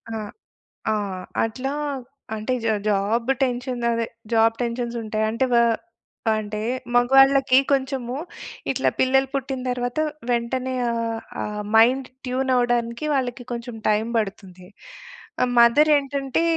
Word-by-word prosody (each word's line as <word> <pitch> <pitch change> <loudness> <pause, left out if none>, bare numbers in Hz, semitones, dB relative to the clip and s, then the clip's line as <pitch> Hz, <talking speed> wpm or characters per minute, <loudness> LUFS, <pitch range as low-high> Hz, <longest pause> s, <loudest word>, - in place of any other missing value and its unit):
ఆ! - - -2 0.8
ఆ! - - +2 0.5
అట్లా 255 +5 -3 0.6
అంటే 215 +4 -2
జా 220 - +2
జాబు 215 +5 +1
టెన్షన్ 250 -1 -1
అదే 230 -1 0 0.3
జాబు 225 0 +4
టెన్షన్స్ 235 0 -2
ఉంటాయి. 215 0 -1
అంటే 230 +4 0
వా 235 - +6 0.8
అంటే 210 0 -4 0.3
మగవాళ్ళకి 270 +1 +5
కొంచెము 260 -2 -1 0.5
ఇట్లా - - +1
పిల్లలు 265 +1 +3
పుట్టిన 270 -1 -2
తర్వాత 245 +2 -2 0.3
వెంటనే 250 +2 -1 0.2
ఆహ్, 230 -1 -2 0.2
ఆ - - -2 0.3
మైండ్ 255 +3 +4 0.2
ట్యూన్ 260 +1 -1
అవ్వడానికి 240 +2 0
వాళ్ళకి 250 -2 -2
కొంచెం 235 0 -5
టైం 215 +1 +2
బడుతుంది. 195 -4 -4 0.8
ఆ - - +6
మదరేంటంటే 280 +3 +4
245 Hz, 115 wpm, -23 LUFS, 230-265 Hz, 0.8 s, వా